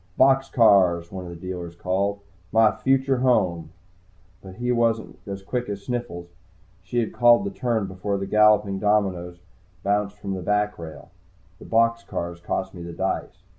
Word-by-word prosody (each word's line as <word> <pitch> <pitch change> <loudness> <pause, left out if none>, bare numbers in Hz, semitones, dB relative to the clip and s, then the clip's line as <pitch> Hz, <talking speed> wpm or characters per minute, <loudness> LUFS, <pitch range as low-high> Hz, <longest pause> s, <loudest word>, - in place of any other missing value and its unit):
"Box 135 0 +4
cars!" 90 -7 +4
one 95 -1 -6
of - - -8
the 85 - -8
dealers 85 -1 -7
called. 100 +3 -1 0.3
"My 110 -1 +5
future 135 0 +1
home." 95 -11 +1 0.7
But 95 -1 -11
he 120 +3 -2
wasn't 115 -2 0
as 100 -1 -6
quick 120 +3 -3
as 100 -1 -5
Sniffles. 115 -9 -5 0.5
She 90 +7 -5
had 115 -3 0
called 120 +6 +5
the 200 - -3
turn 120 - -1
before 95 +2 -3
the 95 - -3
galloping 105 -2 +3
dominoes 95 -4 0
had 90 +1 -32
bounced 105 0 0
from 100 -1 -5
the 95 - -4
backrail. 105 -5 -2 0.5
The - - -12
box 115 0 +2
cars 85 -4 -5
cost 95 +2 -3
me 90 - -9
the 85 0 -7
dice. 90 0 -3
100 Hz, 170 wpm, -24 LUFS, 90-115 Hz, 0.7 s, My